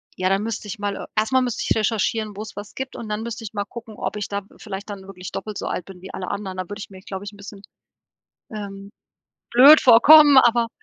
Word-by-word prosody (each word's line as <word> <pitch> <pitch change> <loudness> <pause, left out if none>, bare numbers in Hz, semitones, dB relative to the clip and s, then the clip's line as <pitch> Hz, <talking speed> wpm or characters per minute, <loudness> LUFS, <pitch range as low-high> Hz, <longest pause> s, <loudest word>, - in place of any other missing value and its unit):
ja, 185 0 0
da 195 +1 +2
müsste 220 -1 -5
ich 205 +1 -7
mal, 205 -1 -2
e - - -7
erst 215 +3 0
mal 260 0 +4
müsste 245 -2 -2
ich - - +3
recherchieren, 215 -1 -1
wo's 215 0 -8
was 205 0 -9
gibt. 265 0 -6
Und 220 - -8
dann 210 +1 -3
müsste 230 0 -6
ich 220 - -8
mal 205 -1 -3
gucken, 225 -2 -10
ob - - -4
ich 205 - -4
da 200 0 -3 0.2
vielleicht 200 0 -8
dann 200 -2 -7
wirklich 185 -1 -10
doppelt 215 -2 -6
so - - -4
alt 175 - -4
bin 185 -2 -13
wie 190 - -10
alle 185 - -5
anderen. 195 -2 -5
Da 185 - -2
würde 205 +4 -9
ich - - -8
mir, 190 -1 -13
glaube 190 0 -7
ich, 205 - -8
'n - - -15
bisschen, 200 0 -11 0.9
ähm, 200 -1 -8 0.6
blöd 275 +6 +8
vorkommen, 285 +4 +8
aber 235 -2 +4
210 Hz, 250 wpm, -22 LUFS, 195-230 Hz, 0.9 s, blöd